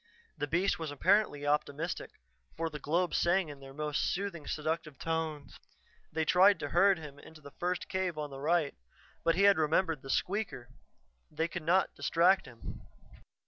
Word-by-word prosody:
The 145 - -3
beast 175 +6 +1
was 160 -2 -3
apparently 145 0 +2
optimistic, 150 +3 -1 0.5
for 165 0 -2
the 150 - -6
globes 170 +5 0
sang 175 -1 +2
in 145 -1 -9
their 135 0 -11
most 150 +1 -2
soothing, 180 -5 -4
seductive 155 -2 -3
tones. 160 -2 -3 0.5
They 160 0 -1
tried 190 +4 +6
to 145 - -3
herd 190 +5 +4
him 150 -3 -10
into 160 +2 -14
the 145 -1 -12
first 180 0 -1
cave 185 -3 -2
on 150 -1 -4
the 135 - -8
right, 155 0 +1 0.5
but 165 0 +3
he 195 - +2
had 200 -4 +6
remembered 160 -1 +1
the 135 - -11
squeaker; 180 - -2 0.6
they 160 +2 -1
could 175 0 -5
not 175 +5 +2
distract 175 0 +3
him. 120 -2 -9
160 Hz, 170 wpm, -31 LUFS, 145-180 Hz, 0.6 s, tried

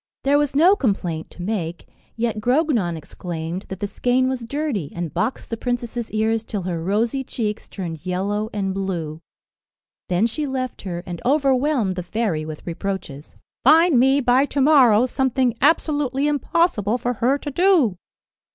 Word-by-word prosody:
There 285 +1 +4
was 290 -2 -1
no 350 +7 +6
complaint 180 - -2
to 175 - -9
make, 175 -5 -3 0.3
yet 230 -2 -1
Grognon 245 - +1
exclaimed 165 +2 -6
that 190 - -5
the 205 - -3
skein 250 +5 +1
was 260 -2 -2
dirty, 240 - -3
and 170 -3 -4
boxed 235 +3 -2
the 230 - -2
princess's 240 -1 -3
ears 220 +1 0
till 205 -4 -4
her 170 -2 -3
rosy 225 +8 0
cheeks 215 -4 -4
turned 170 -5 -6
yellow 200 +4 -2
and 195 -2 -2
blue. 170 -5 -4 0.9
Then 180 +4 +2
she 290 +6 -2
left 260 -2 -3
her, 175 -3 -5
and 175 -2 -6
overwhelmed 270 -6 +2
the 180 - -3
fairy 180 -4 -2
with 155 -1 -8
reproaches. 170 -5 -5 0.3
"Find 315 0 +6
me, 270 +3 +4
by 255 +2 +3
to 285 - -3
morrow, 260 -6 +6
something 255 -1 +1
absolutely 290 -4 +2
impossible 285 - +1
for 245 0 -1
her 260 +4 +3
to 290 0 -6
do." 325 - +3
230 Hz, 160 wpm, -22 LUFS, 185-270 Hz, 0.9 s, no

